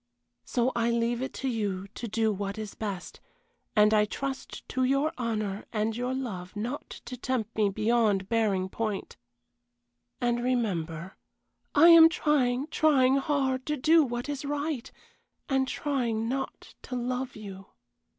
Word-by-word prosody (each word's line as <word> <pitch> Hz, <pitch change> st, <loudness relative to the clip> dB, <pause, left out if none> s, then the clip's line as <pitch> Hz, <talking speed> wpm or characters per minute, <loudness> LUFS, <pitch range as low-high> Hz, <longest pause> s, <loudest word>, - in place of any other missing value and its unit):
So 245 Hz, +1 st, +1 dB
I 235 Hz, 0 st, +2 dB
leave 235 Hz, +1 st, 0 dB
it 265 Hz, -, -3 dB
to 270 Hz, -, -3 dB
you 200 Hz, -6 st, -2 dB
to 235 Hz, +3 st, -6 dB
do 220 Hz, 0 st, +1 dB
what 200 Hz, +1 st, -4 dB
is 215 Hz, -2 st, -5 dB
best, 200 Hz, -4 st, -5 dB, 0.6 s
and 210 Hz, 0 st, +5 dB
I 210 Hz, -1 st, +5 dB
trust 270 Hz, +5 st, -5 dB
to 260 Hz, -, 0 dB
your 275 Hz, +4 st, +2 dB
honor 215 Hz, -4 st, -3 dB
and 220 Hz, 0 st, -1 dB
your 250 Hz, +2 st, -2 dB
love 200 Hz, -8 st, -5 dB
not 235 Hz, +7 st, -4 dB, 0.2 s
to 250 Hz, +1 st, -6 dB
tempt 250 Hz, -3 st, -3 dB
me 210 Hz, -2 st, +3 dB
beyond 215 Hz, -2 st, +1 dB
bearing 210 Hz, -5 st, +1 dB
point 210 Hz, 0 st, -4 dB, 1.0 s
and 240 Hz, 0 st, 0 dB
remember, 190 Hz, -9 st, -2 dB, 0.6 s
I 320 Hz, +4 st, +8 dB
am 330 Hz, -1 st, +10 dB
trying, 280 Hz, -6 st, +1 dB
trying 270 Hz, -4 st, +4 dB
hard, 270 Hz, -2 st, 0 dB
to 300 Hz, 0 st, 0 dB
do 320 Hz, +4 st, +5 dB
what 240 Hz, -1 st, -3 dB
is 290 Hz, -1 st, -4 dB
right 290 Hz, -2 st, -3 dB, 0.6 s
and 265 Hz, -1 st, +1 dB
trying 235 Hz, -7 st, -1 dB
not 265 Hz, +2 st, -4 dB
to 250 Hz, -, -6 dB
love 250 Hz, +1 st, -2 dB
you. 195 Hz, -2 st, -9 dB
240 Hz, 150 wpm, -28 LUFS, 210-265 Hz, 1.0 s, am